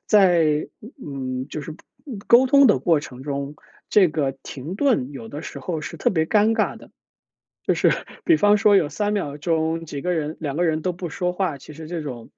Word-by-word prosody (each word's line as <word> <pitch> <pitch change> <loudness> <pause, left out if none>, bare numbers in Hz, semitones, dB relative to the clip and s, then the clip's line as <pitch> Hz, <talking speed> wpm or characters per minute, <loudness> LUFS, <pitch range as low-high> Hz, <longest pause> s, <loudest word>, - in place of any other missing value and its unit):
在 170 -7 +4 0.4
嗯， 130 -2 -4
就 155 - -4
是 155 +2 -7 0.5
沟 245 +3 +6
通 280 +1 +6
的 210 - +4
过 165 -4 +2
程 130 -3 -10
中， 140 0 -4 0.4
这 195 -4 +5
个 150 -3 -1
停 150 +8 -7
顿 210 - +1
有 115 -5 -8
的 145 +5 -7
时 - - -7
候 160 -4 -4
是 165 +1 -7
特 - - +2
别 160 -4 +1
尴 215 +5 +3
尬 - - 0
的。 - - -16 0.8
就 - - +3
是 - - +3 0.3
比 335 -3 +5
方 205 -4 +4
说 205 0 +4
有 160 -6 +4
3 205 +6 -2
秒 150 -9 -2
钟 160 +1 -1
几 145 -3 -6
个 180 +4 -1
人 155 -1 -3
2 145 -3 -3
个 175 - +1
人 160 -2 +1
都 180 +3 -1
不 175 -1 -6
说 180 +3 -2
话， 180 -6 -1
其 145 +3 -12
实 160 0 -9
这 170 0 -4
种， 125 -6 -7
160 Hz, 220 characters per minute, -22 LUFS, 145-190 Hz, 0.8 s, 沟